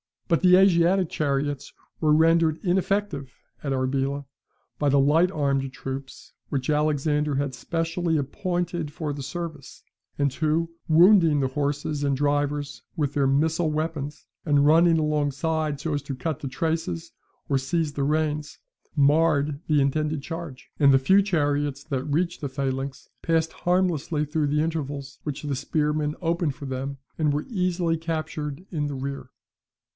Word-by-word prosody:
But 165 Hz, -3 st, +3 dB
the 180 Hz, -1 st, +7 dB
Asiatic 185 Hz, -1 st, +4 dB
chariots 145 Hz, -1 st, -2 dB, 0.3 s
were 155 Hz, -2 st, +3 dB
rendered 160 Hz, 0 st, +4 dB
ineffective 185 Hz, -7 st, -1 dB, 0.3 s
at 140 Hz, -2 st, -2 dB
Arbela 135 Hz, +2 st, -1 dB, 0.5 s
by 145 Hz, -, +1 dB
the 140 Hz, -, +4 dB
light 155 Hz, +6 st, +4 dB
armed 140 Hz, -5 st, 0 dB
troops 135 Hz, -1 st, -7 dB, 0.2 s
whom 140 Hz, -, 0 dB
Alexander 150 Hz, -1 st, +1 dB
had 140 Hz, -1 st, -1 dB
specially 165 Hz, +1 st, -1 dB
appointed 175 Hz, +2 st, -2 dB
for 150 Hz, -1 st, -4 dB
the 140 Hz, -, -6 dB
service, 150 Hz, 0 st, -7 dB, 0.3 s
and 140 Hz, -2 st, +1 dB
who, 160 Hz, +3 st, 0 dB, 0.2 s
wounding 165 Hz, -2 st, +6 dB
the 135 Hz, -, 0 dB
horses 145 Hz, +1 st, -2 dB
and 140 Hz, -1 st, +1 dB
drivers 145 Hz, 0 st, -1 dB
with 145 Hz, -4 st, -1 dB
their 140 Hz, -2 st, +2 dB
missile 155 Hz, +4 st, +2 dB
weapons, 155 Hz, -2 st, -3 dB, 0.2 s
and 145 Hz, -2 st, +3 dB
running 165 Hz, +2 st, +5 dB
alongside 150 Hz, 0 st, 0 dB
so 155 Hz, +1 st, -2 dB
as 145 Hz, -, -1 dB
to 140 Hz, -1 st, -5 dB
cut 135 Hz, +3 st, -3 dB
the 140 Hz, -, -5 dB
traces 160 Hz, -, -2 dB, 0.4 s
or 135 Hz, -, +2 dB
seize 155 Hz, +2 st, -1 dB
the 140 Hz, -, -2 dB
reins, 150 Hz, 0 st, -1 dB, 0.4 s
marred 145 Hz, 0 st, +3 dB
the 150 Hz, -2 st, +3 dB
intended 150 Hz, +1 st, 0 dB
charge; 165 Hz, -5 st, -7 dB
and 140 Hz, -2 st, +6 dB
the 135 Hz, -, +6 dB
few 190 Hz, +10 st, +4 dB
chariots 145 Hz, -6 st, 0 dB
that 135 Hz, -4 st, -3 dB
reached 170 Hz, +4 st, -1 dB
the 140 Hz, -, -3 dB
phalanx 135 Hz, 0 st, -3 dB
passed 165 Hz, -1 st, +1 dB
harmlessly 175 Hz, -4 st, 0 dB
through 150 Hz, 0 st, 0 dB
the 150 Hz, +1 st, +1 dB
intervals 145 Hz, -4 st, -3 dB
which 150 Hz, -1 st, -5 dB
the 145 Hz, -2 st, -2 dB
spearmen 150 Hz, +2 st, -1 dB
opened 165 Hz, -4 st, 0 dB
for 140 Hz, -, -8 dB
them, 135 Hz, +1 st, -4 dB, 0.2 s
and 150 Hz, -2 st, +2 dB
were 150 Hz, +1 st, -2 dB
easily 180 Hz, -5 st, 0 dB
captured 155 Hz, -1 st, -4 dB
in 150 Hz, -4 st, -1 dB
the 145 Hz, -, -4 dB
rear. 140 Hz, +1 st, -5 dB
150 Hz, 150 wpm, -25 LUFS, 140-165 Hz, 0.5 s, the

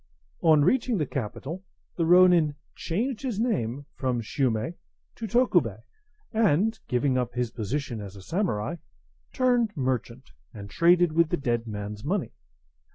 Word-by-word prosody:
On 155 Hz, -3 st, +5 dB
reaching 245 Hz, +3 st, +2 dB
the 155 Hz, -, 0 dB
capital, 140 Hz, -, -5 dB, 0.3 s
the 165 Hz, -2 st, 0 dB
ronin 175 Hz, -4 st, +5 dB, 0.2 s
changed 225 Hz, +8 st, -2 dB
his 245 Hz, -7 st, -3 dB
name 145 Hz, -, -1 dB
from 130 Hz, -3 st, -1 dB
Shume 115 Hz, +4 st, -1 dB, 0.4 s
to 225 Hz, -, -6 dB
Tokubei, 245 Hz, +3 st, +2 dB, 0.5 s
and, 220 Hz, 0 st, +2 dB
giving 130 Hz, +1 st, +1 dB
up 125 Hz, -1 st, -3 dB
his 125 Hz, -2 st, -1 dB
position 120 Hz, +1 st, -3 dB
as 100 Hz, -1 st, -9 dB
a 95 Hz, -, -11 dB
samurai, 165 Hz, -, -1 dB, 0.5 s
turned 245 Hz, -6 st, +1 dB
merchant, 130 Hz, -1 st, -3 dB, 0.2 s
and 100 Hz, -2 st, -9 dB
traded 175 Hz, -, +4 dB
with 165 Hz, 0 st, +3 dB
the -, -, 0 dB
dead 120 Hz, -3 st, -1 dB
man's 105 Hz, 0 st, -6 dB
money. 185 Hz, +5 st, -1 dB
145 Hz, 140 wpm, -26 LUFS, 120-190 Hz, 0.5 s, On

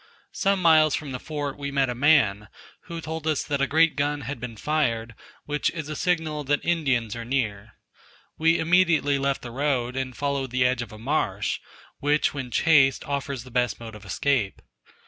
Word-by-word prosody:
Some 195 Hz, -1 st, 0 dB
miles 155 Hz, -3 st, +5 dB
from 145 Hz, -3 st, -5 dB
the 125 Hz, -, -4 dB
fort 145 Hz, -2 st, -5 dB
we 140 Hz, 0 st, -3 dB
met 140 Hz, -1 st, +1 dB
a 125 Hz, -, -2 dB
man, 120 Hz, -7 st, +3 dB, 0.4 s
who 170 Hz, -2 st, -6 dB
told 160 Hz, 0 st, -5 dB
us 155 Hz, -2 st, +1 dB
that 140 Hz, -1 st, -2 dB
a 140 Hz, -, +2 dB
great 160 Hz, +1 st, +3 dB
gun 145 Hz, 0 st, -1 dB
had 130 Hz, +1 st, -5 dB
been 115 Hz, -2 st, -7 dB
fired, 115 Hz, -6 st, -1 dB, 0.3 s
which 150 Hz, 0 st, 0 dB
is 155 Hz, -2 st, -5 dB
a 155 Hz, -, -4 dB
signal 160 Hz, -4 st, -1 dB
that 145 Hz, +1 st, 0 dB
Indians 135 Hz, -10 st, 0 dB
are 115 Hz, -, -5 dB
near. 110 Hz, -4 st, -2 dB, 0.6 s
We 165 Hz, +1 st, +3 dB
immediately 165 Hz, -4 st, +3 dB
left 140 Hz, 0 st, -1 dB
the 120 Hz, -, -7 dB
road, 130 Hz, -2 st, -1 dB
and 130 Hz, -3 st, -4 dB
followed 140 Hz, -2 st, -1 dB
the 125 Hz, +1 st, +1 dB
edge 125 Hz, -1 st, +1 dB
of 120 Hz, -, -7 dB
a 110 Hz, -, -10 dB
marsh, 110 Hz, -5 st, -1 dB, 0.4 s
which 145 Hz, +1 st, +2 dB
when 135 Hz, -3 st, -5 dB
chased 135 Hz, -1 st, +4 dB
offers 140 Hz, -3 st, -3 dB
the 130 Hz, -, -13 dB
best 125 Hz, 0 st, 0 dB
mode 115 Hz, -1 st, -9 dB
of 105 Hz, -1 st, -11 dB
escape. 105 Hz, +3 st, -1 dB
140 Hz, 190 wpm, -25 LUFS, 120-155 Hz, 0.6 s, miles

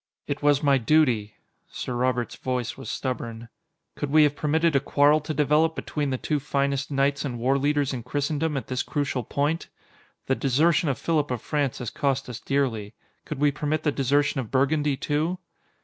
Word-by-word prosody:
"It 145 Hz, 0 st, -3 dB
was 145 Hz, 0 st, +3 dB
my 140 Hz, -2 st, +4 dB
duty." 120 Hz, -6 st, +2 dB, 0.3 s
Sir 125 Hz, -, -5 dB
Robert's 125 Hz, -1 st, 0 dB
voice 125 Hz, -3 st, -3 dB
was 135 Hz, -, -8 dB
stubborn. 115 Hz, -3 st, -4 dB, 0.4 s
"Could 145 Hz, -, -4 dB
we 155 Hz, +2 st, +6 dB
have 145 Hz, -1 st, +2 dB
permitted 160 Hz, +1 st, +1 dB
a -, -, +6 dB
quarrel 145 Hz, +2 st, +3 dB
to 155 Hz, -, -5 dB
develop 155 Hz, +2 st, +2 dB
between 145 Hz, -2 st, -2 dB
the 130 Hz, -, -1 dB
two 150 Hz, +3 st, -1 dB
finest 140 Hz, -1 st, -1 dB
knights 140 Hz, 0 st, +1 dB
and 130 Hz, -4 st, -3 dB
warleaders 140 Hz, +3 st, +1 dB
in 125 Hz, -, -4 dB
Christendom 145 Hz, +4 st, -1 dB
at 135 Hz, -, -4 dB
this 130 Hz, 0 st, -2 dB
crucial 140 Hz, -4 st, -2 dB
point? 145 Hz, +8 st, -1 dB, 0.6 s
The 130 Hz, -, +1 dB
desertion 150 Hz, +5 st, +2 dB
of 135 Hz, -, -1 dB
Philip 155 Hz, -3 st, 0 dB
of 125 Hz, -2 st, -2 dB
France 145 Hz, -5 st, -1 dB
has 120 Hz, -, -5 dB
cost 135 Hz, -1 st, -1 dB
us 120 Hz, -1 st, -6 dB
dearly. 120 Hz, -8 st, -1 dB, 0.3 s
Could 150 Hz, -, -5 dB
we 145 Hz, +1 st, +3 dB
permit 150 Hz, +3 st, -2 dB
the 150 Hz, -, +2 dB
desertion 140 Hz, +1 st, +1 dB
of 115 Hz, -, -8 dB
Burgundy, 140 Hz, +1 st, +1 dB
too?" 155 Hz, +6 st, -1 dB
140 Hz, 180 wpm, -25 LUFS, 130-150 Hz, 0.6 s, we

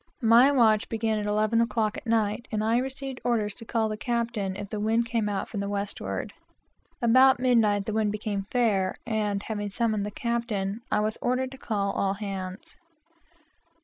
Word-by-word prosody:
My 235 Hz, +5 st, +7 dB
watch 225 Hz, -5 st, +3 dB
began 220 Hz, -1 st, 0 dB
at 210 Hz, -, -3 dB
eleven 215 Hz, +2 st, +2 dB
o'clock 225 Hz, -2 st, 0 dB
at -, -, -8 dB
night, 225 Hz, 0 st, 0 dB
and 215 Hz, -1 st, -1 dB
I 225 Hz, +2 st, +2 dB
received 265 Hz, 0 st, -4 dB
orders 215 Hz, -4 st, 0 dB
to 230 Hz, -, -10 dB
call 220 Hz, -1 st, 0 dB
the 215 Hz, -, -3 dB
captain 230 Hz, -4 st, -2 dB
if 200 Hz, 0 st, -7 dB
the 210 Hz, -, -3 dB
wind 225 Hz, +2 st, +1 dB
came 230 Hz, -3 st, -1 dB
out 200 Hz, -1 st, -2 dB
from 205 Hz, -, -5 dB
the 200 Hz, 0 st, -2 dB
westward. 200 Hz, 0 st, -4 dB, 0.7 s
About 260 Hz, +2 st, +6 dB
midnight 225 Hz, -5 st, +3 dB
the 215 Hz, -, -3 dB
wind 215 Hz, -1 st, +1 dB
became 205 Hz, -2 st, -3 dB
fair, 205 Hz, -7 st, +1 dB
and 210 Hz, -3 st, -1 dB
having 205 Hz, -2 st, -3 dB
called 215 Hz, 0 st, 0 dB
the 205 Hz, -, -3 dB
captain, 225 Hz, -2 st, -2 dB
I -, -, +2 dB
was 215 Hz, 0 st, -1 dB
ordered 255 Hz, +1 st, 0 dB
to 265 Hz, -, -11 dB
call 200 Hz, -3 st, -1 dB
all 195 Hz, 0 st, 0 dB
hands. 195 Hz, -2 st, -6 dB
220 Hz, 180 wpm, -27 LUFS, 205-235 Hz, 0.7 s, My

